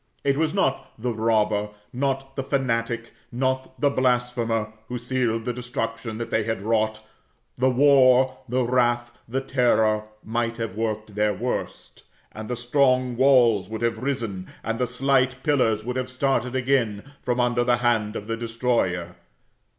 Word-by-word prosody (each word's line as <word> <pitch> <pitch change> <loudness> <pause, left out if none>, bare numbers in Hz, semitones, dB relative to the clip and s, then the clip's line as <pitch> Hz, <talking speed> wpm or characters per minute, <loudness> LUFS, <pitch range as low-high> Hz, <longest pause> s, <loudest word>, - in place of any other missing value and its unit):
It 140 - +2
was 155 +1 +1
not 135 - -1
the 120 +1 -1
robber, 110 -2 +1 0.2
not 135 +1 -2
the 135 - -1
fanatic, 115 -4 -1 0.2
not 130 +1 -2
the 145 -1 +3
blasphemer, 120 -4 0
who 125 - -4
sealed 120 -2 -1
the 125 - -1
destruction 115 -2 -4
that 115 - -5
they 110 - +2
had 110 -2 -3
wrought; 110 0 0 0.5
the 130 +1 +2
war, 130 -1 +5
the 125 +1 +1
wrath, 120 -1 +1
the 135 +3 -1
terror, 110 -5 +2 0.2
might 115 +1 -2
have 115 -4 -3
worked 110 -1 -3
their 105 0 +1
worst, 120 +6 -4 0.3
and 110 +1 -8
the 125 - -1
strong 130 0 +2
walls 120 -7 +4
would 110 +1 -4
have 115 -1 0
risen, 115 -9 -3 0.2
and 115 +1 -2
the 125 - +1
slight 130 +1 +1
pillars 115 -8 +2
would 125 +1 -3
have 130 0 -2
started 130 -1 0
again, 125 -6 +1 0.2
from 125 0 -1
under 120 0 +2
the 120 0 +3
hand 115 -3 +1
of 105 - -5
the 115 +1 -2
destroyer. 115 -7 -1
120 Hz, 160 wpm, -24 LUFS, 110-130 Hz, 0.5 s, war